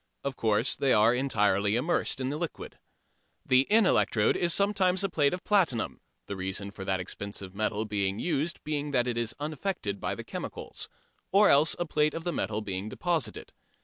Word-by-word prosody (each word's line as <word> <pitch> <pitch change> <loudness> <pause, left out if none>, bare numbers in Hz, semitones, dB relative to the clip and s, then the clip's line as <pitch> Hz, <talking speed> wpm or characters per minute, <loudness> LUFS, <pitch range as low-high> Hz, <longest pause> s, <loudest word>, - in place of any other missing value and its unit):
Of 140 -1 -3
course 110 +2 +2
they 135 - +2
are 110 +3 +5
entirely 105 -5 +2
immersed 140 +3 0
in 130 0 -1
the 150 - -3
liquid. 170 0 -6 0.7
The 130 +1 +4
in 220 0 +5
electrode 105 - +3
is 175 -1 +1
sometimes 195 -1 +2
a 195 - 0
plate 145 -5 +2
of 180 - -4
platinum 180 - +1 0.2
(the 100 - -5
reason 95 +2 -4
that 95 -1 -2
expensive 95 0 -5
metal 110 +1 -1
is 100 -2 0
used 165 0 -1
being 150 -1 -2
that 125 -2 +2
it 120 - -1
is 115 -1 -2
unaffected 150 - -3
by - - -2
the - - -7
chemicals) - - -6 0.4
or 200 +2 +6
else 145 +3 +5
a 175 - -1
plate 150 -1 +1
of 165 - -4
the 175 0 -2
metal 110 0 -2
being 100 0 -4
deposited. 160 -7 -2
130 Hz, 180 wpm, -28 LUFS, 105-170 Hz, 0.7 s, or